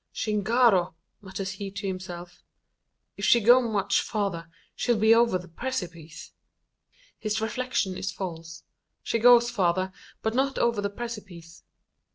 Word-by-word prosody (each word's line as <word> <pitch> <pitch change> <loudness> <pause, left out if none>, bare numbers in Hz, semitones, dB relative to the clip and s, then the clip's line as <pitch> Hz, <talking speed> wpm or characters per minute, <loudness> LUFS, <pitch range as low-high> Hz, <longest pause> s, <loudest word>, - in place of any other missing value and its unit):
"Chingaro!" 210 -4 +2 0.3
mutters 190 -1 -5
he 200 +1 -6
to 200 +1 -7
himself, 180 -2 -6 0.8
"if - - -7
she 240 - +5
go 240 +4 +6
much 205 -4 +1
farther, 195 -7 -3 0.3
she'll 240 -2 +1
be 220 +1 +5
over 230 -4 +3
the 180 0 -11
precipice!" 170 -7 -6 0.9
His 215 -1 -1
reflection 220 -3 -2
is 190 0 -3
false. 165 -3 -7 0.4
She 230 - -1
goes 240 0 +6
farther, 185 -3 0 0.3
but 220 - 0
not 270 +2 0
over 235 -3 +1
the 200 - -1
precipice. 200 -7 -9
200 Hz, 135 wpm, -26 LUFS, 180-235 Hz, 0.9 s, go